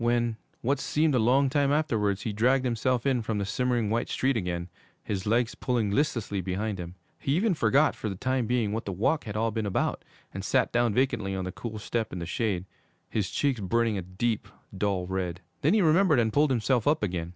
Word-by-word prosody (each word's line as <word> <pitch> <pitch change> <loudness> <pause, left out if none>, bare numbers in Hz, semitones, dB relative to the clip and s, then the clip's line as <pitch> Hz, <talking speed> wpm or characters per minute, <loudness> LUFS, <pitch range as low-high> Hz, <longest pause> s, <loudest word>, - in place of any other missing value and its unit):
When, 120 -1 +1 0.2
what 135 +3 +1
seemed 155 +1 +1
a 125 - +3
long 130 +5 +4
time 140 +1 +2
afterwards, 110 -10 +1
he 110 - -2
dragged 125 +5 +2
himself 125 +1 0
in 130 -3 +2
from 110 -1 -2
the 100 - -1
simmering, 120 -1 0
white 115 +1 0
street 135 0 +1
again, 90 -4 -2 0.4
his 100 -1 -3
legs 115 +2 +2
pulling 120 -5 -1
listlessly 110 -6 0
behind 95 +2 -3
him, 90 0 -7 0.2
he 140 - 0
even 200 +3 +2
forgot, 140 +1 +3
for 110 - -4
the 95 - -4
time 130 +3 -1
being, 120 -4 +1
what 115 +2 -3
the 100 - -3
walk 110 - 0
had 105 -1 -4
all 115 +1 +1
been 110 -1 -2
about, 95 - -1 0.3
and - - -5
sat - - +2
down 120 -3 +2
vacantly 110 -7 +1
on 95 -1 -3
the 90 - -4
cool 110 +3 -6
step 110 +1 -2
in - - -5
the 85 - -4
shade, 95 0 -1 0.5
his 105 -4 -1
cheeks 140 -5 0
burning 115 +3 +1
a 95 - -2
deep, 100 +5 -2 0.3
dull 95 -2 0
red. 90 -1 -3 0.2
Then 155 +9 +3
he 210 - +4
remembered 160 -2 +4
and 110 -2 +1
pulled 150 +1 +4
himself 125 -1 +1
up 150 -5 +3
again. 90 -4 -2
115 Hz, 220 wpm, -28 LUFS, 100-130 Hz, 0.5 s, long